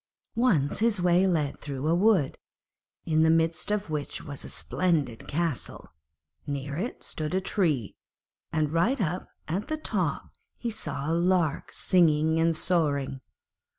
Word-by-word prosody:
Once 200 - +2
his 220 -2 +2
way 180 +1 +4
led 155 -6 0
through 140 0 -4
a 165 - +3
wood, 185 -5 +3 0.7
in 155 -1 +2
the 160 - +5
midst 165 +2 +2
of 210 0 0
which 150 -2 -3
was 140 -1 -6
a - - -7
splendid 155 -11 -1
castle; 165 -3 -3 0.5
near 140 0 -3
it 210 - -4
stood 155 +3 -3
a - - +3
tree, 160 - 0 0.6
and 155 -2 0
right 220 +12 +2
up 180 -2 -1 0.2
at 185 - -2
the 310 0 -2
top 310 - -2 0.3
he 235 - -3
saw 150 -10 -4
a 160 - 0
lark 170 -3 +1
singing 160 -3 +3
and 165 -1 +2
soaring. 140 -6 0
165 Hz, 150 wpm, -27 LUFS, 150-185 Hz, 0.7 s, the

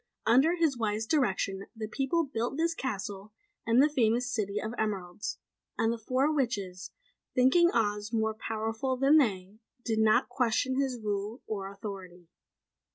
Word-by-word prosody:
Under 270 +9 +5
his 325 -5 +2
wise 220 -1 -1
direction 195 -7 0
the 220 -1 -5
people 270 +9 0
built 265 -1 -3
this 335 +1 +1
castle 205 -6 -5 0.3
and 235 +4 +5
the - - +6
famous 245 -3 +1
city 205 -2 -2
of 220 +1 -4
Emeralds; 200 -4 -3 0.4
and 225 +1 +2
the 235 - -6
four 260 +7 +1
witches, 200 -9 -2 0.5
thinking 265 +8 +5
Oz 210 -1 0
more 220 -1 0
powerful 225 +4 -2
than 275 +4 +5
they, 200 -5 -1 0.3
did 220 -2 0
not 220 +3 +4
question 260 +2 +1
his 260 -3 -2
rule 210 +2 -3
or 195 -2 -4
authority. 190 -4 -9
225 Hz, 150 wpm, -29 LUFS, 205-260 Hz, 0.5 s, the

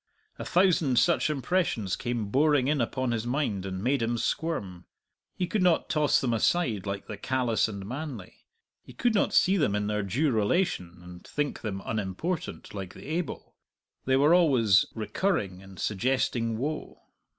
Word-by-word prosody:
A - - -5
thousand 170 -8 +3
such 170 +3 +3
impressions 140 - 0
came 120 -4 -3
boring 145 +1 +3
in 145 -2 +1
upon 130 +1 -1
his 115 0 -2
mind 115 -8 -1
and 95 0 -5
made 135 +1 +1
him 115 +1 0
squirm. 105 - -3 0.5
He 180 - -1
could 200 +3 -1
not 180 -3 +2
toss 150 -2 +3
them 125 -4 0
aside 115 - +1
like 100 0 -4
the 105 - -7
callous 125 0 +1
and 100 -3 -6
manly; 130 -3 -6 0.5
he - - -14
could 240 -2 +1
not 205 - +2
see 195 +2 +4
them 105 - +1
in 105 0 -1
their 105 0 -1
due 130 - 0
relation, 105 - 0
and 90 0 -11
think 145 -1 -3
them 100 -3 -4
unimportant, 110 - -3
like 95 -2 -6
the - - -11
able; 170 +1 -4 0.5
they 130 - +3
were 145 +5 +5
always 130 - +4
recurring 110 - -1
and 95 -1 -13
suggesting 115 +1 0
woe. 150 +5 -4
120 Hz, 165 wpm, -28 LUFS, 100-155 Hz, 0.5 s, were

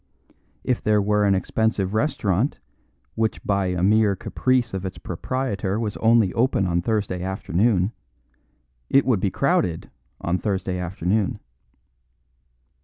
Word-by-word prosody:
If 125 - 0
there 105 -1 +3
were 105 +1 +2
an 100 -1 +4
expensive 100 0 0
restaurant 115 - 0 0.6
which 110 0 -1
by 100 -2 0
a 90 -1 -1
mere 105 0 +4
caprice 125 +4 0
of 95 -1 -3
its 95 -1 -5
proprietor 100 0 -3
was 105 -2 -3
only 115 -4 +3
open 115 -5 +1
on 85 -1 +1
Thursday 100 -3 -1
afternoon, 95 +2 +1 1.0
it 135 - +4
would 125 -6 +2
be 95 - +1
crowded 85 -2 0 0.3
on 90 +2 -1
Thursday 95 -3 -2
afternoon. 95 +3 -1
100 Hz, 125 wpm, -23 LUFS, 95-110 Hz, 1.0 s, an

